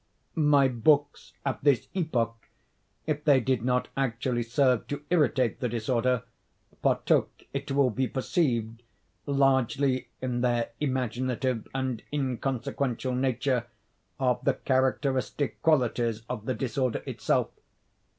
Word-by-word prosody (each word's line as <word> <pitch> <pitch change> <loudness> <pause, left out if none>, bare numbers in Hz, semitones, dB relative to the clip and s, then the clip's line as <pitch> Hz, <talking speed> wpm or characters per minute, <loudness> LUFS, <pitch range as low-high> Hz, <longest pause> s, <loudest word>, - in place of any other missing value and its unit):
My 145 -3 +4
books, 140 +4 +1
at 135 - -2
this 140 -5 +3
epoch, 120 - -1 0.6
if 150 -1 -2
they 145 -3 +5
did 130 -2 0
not 125 0 +1
actually 125 -2 -1
serve 125 +1 +2
to 145 0 -5
irritate 130 -8 +2
the 125 -3 -1
disorder, 120 +1 0 0.6
partook, - - +2 0.2
it 140 0 -4
will 135 -2 +3
be 130 +4 0
perceived, 120 -5 -1 0.5
largely, 135 -1 +2
in 125 -2 -2
their 120 -2 +1
imaginative 130 -2 -1
and 130 -4 -2
inconsequential 130 -2 -2
nature, 125 -1 0 0.5
of 125 -2 +1
the - - +2
characteristic 130 +1 0
qualities 120 -7 +2
of 115 -4 -5
the 130 - 0
disorder 130 +1 -1
itself. - - 0
130 Hz, 115 wpm, -28 LUFS, 120-140 Hz, 0.6 s, they